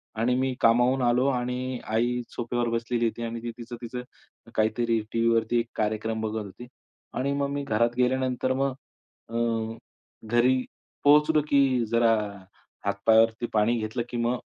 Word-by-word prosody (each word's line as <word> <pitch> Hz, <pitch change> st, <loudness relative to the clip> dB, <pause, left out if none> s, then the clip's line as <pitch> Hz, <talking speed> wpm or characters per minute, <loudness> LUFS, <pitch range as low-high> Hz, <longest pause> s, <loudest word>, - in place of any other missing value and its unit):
आणि 120 Hz, +3 st, +1 dB
मी 130 Hz, -1 st, 0 dB
कामावरून 120 Hz, +3 st, +4 dB
आलो 125 Hz, +1 st, +3 dB
आणि 125 Hz, -1 st, -2 dB
आई 120 Hz, +2 st, +1 dB
सोफ्यावर 120 Hz, 0 st, -2 dB
बसलेली 115 Hz, +1 st, -1 dB
होती 115 Hz, +1 st, -2 dB
आणि 115 Hz, 0 st, -4 dB, 0.2 s
तिचं-तिचं 120 Hz, +1 st, -7 dB, 0.5 s
काहीतरी 115 Hz, +1 st, +1 dB
टीव्हीवरती 115 Hz, 0 st, +2 dB
एक 115 Hz, -, -2 dB
कार्यक्रम 110 Hz, +1 st, -1 dB
बघत 110 Hz, 0 st, -2 dB
होती. 120 Hz, +5 st, -11 dB, 0.5 s
आणि 140 Hz, +2 st, -1 dB
मग 140 Hz, 0 st, 0 dB
मी 145 Hz, 0 st, -3 dB
घरात 115 Hz, -1 st, +1 dB
गेल्यानंतर 130 Hz, 0 st, +1 dB
मग 135 Hz, 0 st, 0 dB, 0.6 s
अ, 115 Hz, -, -7 dB, 0.9 s
घरी 125 Hz, +3 st, +3 dB, 0.4 s
पोहोचलो 150 Hz, +1 st, +5 dB
की 140 Hz, -, +4 dB, 0.3 s
जरा 115 Hz, -1 st, +4 dB, 0.7 s
हात 100 Hz, -, +1 dB
पायावरती 115 Hz, +1 st, +4 dB
पाणी 110 Hz, +2 st, +3 dB
घेतलं, 110 Hz, +2 st, -3 dB
की 120 Hz, -, -4 dB
मग 120 Hz, +1 st, +1 dB
120 Hz, 140 wpm, -26 LUFS, 115-125 Hz, 0.9 s, पोहोचलो